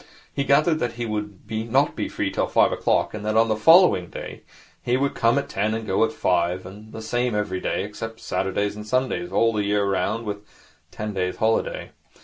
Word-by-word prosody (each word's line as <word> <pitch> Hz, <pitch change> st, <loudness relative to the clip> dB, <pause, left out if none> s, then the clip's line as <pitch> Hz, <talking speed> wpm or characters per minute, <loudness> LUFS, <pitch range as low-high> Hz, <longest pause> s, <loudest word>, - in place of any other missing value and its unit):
He 140 Hz, -, -1 dB
gathered 155 Hz, +3 st, +3 dB
that 120 Hz, -4 st, -1 dB
he 120 Hz, 0 st, -4 dB
would 105 Hz, -2 st, -4 dB
not 115 Hz, +6 st, +1 dB
be -, -, -3 dB
free -, -, -2 dB
till -, -, 0 dB
five -, -, +3 dB
o'clock, -, -, +1 dB
and 105 Hz, -1 st, -6 dB
that 110 Hz, +1 st, 0 dB
on 115 Hz, 0 st, +4 dB
the 110 Hz, -, +2 dB
following 165 Hz, -, +5 dB
day -, -, -8 dB, 0.4 s
he 125 Hz, +1 st, +1 dB
would 140 Hz, +1 st, 0 dB
come 115 Hz, +3 st, +2 dB
at 140 Hz, 0 st, -1 dB
ten 110 Hz, -2 st, -1 dB
and 110 Hz, 0 st, -4 dB
go 95 Hz, +2 st, +2 dB
at 110 Hz, -, +1 dB
five, 90 Hz, -2 st, 0 dB
and 105 Hz, +3 st, -11 dB
the 110 Hz, -, -8 dB
same 120 Hz, +1 st, -1 dB
every 105 Hz, -3 st, -1 dB
day, -, -, -1 dB
except 115 Hz, 0 st, -7 dB
Saturdays 95 Hz, +2 st, -2 dB
and 105 Hz, 0 st, -8 dB
Sundays, 130 Hz, +9 st, -1 dB
all 115 Hz, 0 st, +3 dB
the 105 Hz, -1 st, 0 dB
year 100 Hz, 0 st, +1 dB
round, 100 Hz, +4 st, -1 dB
with 105 Hz, -1 st, -3 dB
a -, -, -21 dB, 0.5 s
ten 105 Hz, 0 st, -5 dB
days' 90 Hz, -1 st, -1 dB
holiday. 110 Hz, 0 st, 0 dB
110 Hz, 215 wpm, -23 LUFS, 100-120 Hz, 0.5 s, following